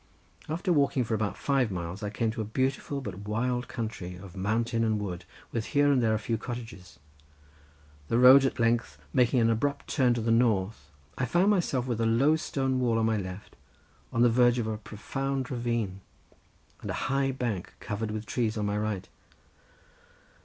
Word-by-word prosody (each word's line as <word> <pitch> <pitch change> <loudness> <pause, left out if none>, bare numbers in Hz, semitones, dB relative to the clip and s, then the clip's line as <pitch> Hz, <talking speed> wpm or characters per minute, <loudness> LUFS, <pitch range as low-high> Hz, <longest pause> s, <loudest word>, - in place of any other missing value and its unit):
After 175 +4 0
walking 140 -4 +2
for 115 - -3
about 110 -2 -1
five 135 -5 +1
miles 90 0 -5
I 105 - -2
came 110 +2 -1
to 110 0 -4
a - - -1
beautiful 130 +5 -2
but 100 -4 -7
wild 125 +3 -1
country 110 -6 -5
of 90 0 -11
mountain 115 +4 0
and 110 -1 +1
wood 90 -4 -5 0.3
with 115 -2 -2
here 145 0 +5
and 135 -3 +3
there 110 -2 +2
a - - +1
few 115 +1 -2
cottages. 115 -7 -8 1.1
The 115 - +1
road 130 +2 +8
at 135 - 0
length 115 -10 +1 0.2
making 125 0 +3
an 115 0 +4
abrupt 140 +5 -1
turn 125 -4 +3
to 120 - -2
the 115 +1 0
north 110 - +1 0.3
I 130 - +1
found 175 - +3
myself 155 -10 +1
with 120 -3 -2
a 115 - +2
low 135 +7 +4
stone 135 -4 -1
wall 120 -3 +2
on 110 - +2
my 110 -1 +2
left 95 0 -7 0.6
on 115 - +2
the 120 - +6
verge 120 +1 +4
of 120 - 0
a 110 -1 -3
profound 135 +5 -4
ravine, 115 -6 -2 0.8
and - - -6
a - - -1 0.2
high 135 0 +2
bank 120 -8 -3
covered 110 0 -4
with 110 0 -4
trees 115 -2 -1
on 105 - -1
my 105 0 0
right. 105 -3 -3
115 Hz, 190 wpm, -28 LUFS, 105-130 Hz, 1.1 s, road